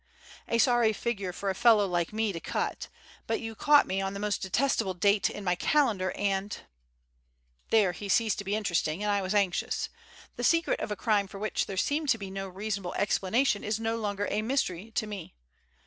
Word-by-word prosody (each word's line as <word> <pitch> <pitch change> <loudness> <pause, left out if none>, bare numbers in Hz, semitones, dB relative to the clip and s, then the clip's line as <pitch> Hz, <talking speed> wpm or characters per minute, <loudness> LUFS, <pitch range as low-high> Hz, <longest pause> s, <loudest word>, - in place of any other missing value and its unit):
A 230 - +1
sorry 240 -2 +4
figure 200 -4 -3
for 195 +2 -2
a - - -2
fellow 220 -1 +5
like 175 -2 -1
me 215 -1 -1
to 165 - -4
cut; - - -3 0.4
but 225 - 0
you 225 -1 -5
caught 290 +6 +5
me 190 +1 -1
on 195 0 -3
the - - -4
most 210 -1 -1
detestable 205 -1 0
date 200 +2 +3
in 205 - -7
my 180 -2 +2
calendar 210 -3 +1
and 200 0 -1 0.6
" - - -43
There 210 -5 +4
he 200 +3 -7
ceased 215 -1 +2
being 200 +2 -1
interesting 180 -3 -1
and 210 - +1
I 200 -1 +1 0.2
anxious. 190 -3 -1 0.5
The - - -4
secret 335 +1 +2
of - - -3
a 210 - -2
crime 205 -1 +1
for 195 - -10
which 215 +2 -1
there 195 - -5
seemed 290 - 0
to 225 - +4
be 195 -3 -7
no 195 0 -4
reasonable 195 -1 -4
explanation 205 +3 +1
is 215 +1 -1
no 225 0 -1
longer 205 -2 -2
a 210 - 0
mystery 220 -5 -1
to 225 - -1
me. 200 - -8
205 Hz, 200 wpm, -29 LUFS, 190-225 Hz, 0.6 s, fellow